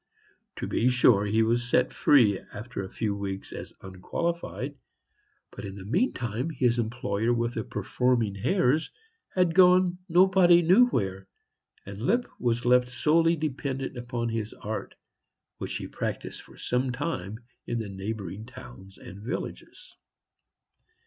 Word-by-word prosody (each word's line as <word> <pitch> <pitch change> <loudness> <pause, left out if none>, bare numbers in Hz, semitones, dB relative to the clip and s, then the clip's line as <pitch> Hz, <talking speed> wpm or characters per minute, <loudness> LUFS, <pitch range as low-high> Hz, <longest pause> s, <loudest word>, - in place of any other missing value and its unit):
To - - -4
be 125 - +1
sure, 120 -4 +4
he 110 +2 +3
was 120 +2 +1
set 125 +1 +2
free 115 -9 +5
again - - -16
after 110 0 -5
a 95 - -7
few 105 -1 -2
weeks 100 -1 -5
as - - -7
unqualified; 135 - -4 0.8
but - - -9
in 100 -1 -6
the 95 -2 -9
meantime 125 - -1
his 125 -6 +1
employer 115 -1 -1
with 120 0 0
the 110 - -3
performing 115 +1 0
hares 130 - +1 0.5
had 180 -3 +3
gone 180 0 +5
nobody 175 0 +6
knew 195 +9 +6
where, 95 - -2 0.6
and 100 +1 -8
Lipp 235 - +2
was 120 0 0
left 125 0 +4
solely 165 +5 +3
dependent 135 -4 -4
on 120 -1 -1
his 110 -1 -4
art, 105 -1 -5 0.6
which - - -4
he - - -4
practised - - -5
for - - -17
some 125 +1 -1
time 125 - -4 0.3
in 120 - -1
the 110 -2 -3
neighboring 100 +1 -6
towns 95 -7 -12
and 95 +3 -11
villages. 130 - -6
120 Hz, 140 wpm, -27 LUFS, 105-150 Hz, 0.8 s, nobody